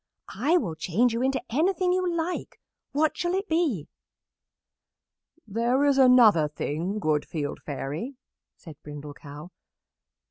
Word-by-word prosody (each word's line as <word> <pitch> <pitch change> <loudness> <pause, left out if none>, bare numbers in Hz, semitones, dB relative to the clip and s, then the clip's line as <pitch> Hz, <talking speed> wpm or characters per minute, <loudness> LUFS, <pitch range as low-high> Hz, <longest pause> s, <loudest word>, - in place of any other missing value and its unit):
"I 330 +5 +3
will 200 - -2
change 185 +10 +1
you 230 - -1
into 265 +1 +1
anything 360 - +2
you 365 -1 0
like. 340 +1 -3 0.3
What 310 +2 +1
shall 350 +1 -1
it 390 +2 -2
be?" 300 - 0 1.6
"There 235 +6 +1
is 280 -1 +3
another 235 - +6
thing, 160 +6 -3
good 155 -7 +1
Field 145 -3 -4
Fairy," 150 - -5 0.4
said 160 -5 -13
Brindle 150 0 -8
Cow. 150 +3 -11
235 Hz, 130 wpm, -26 LUFS, -, 1.6 s, another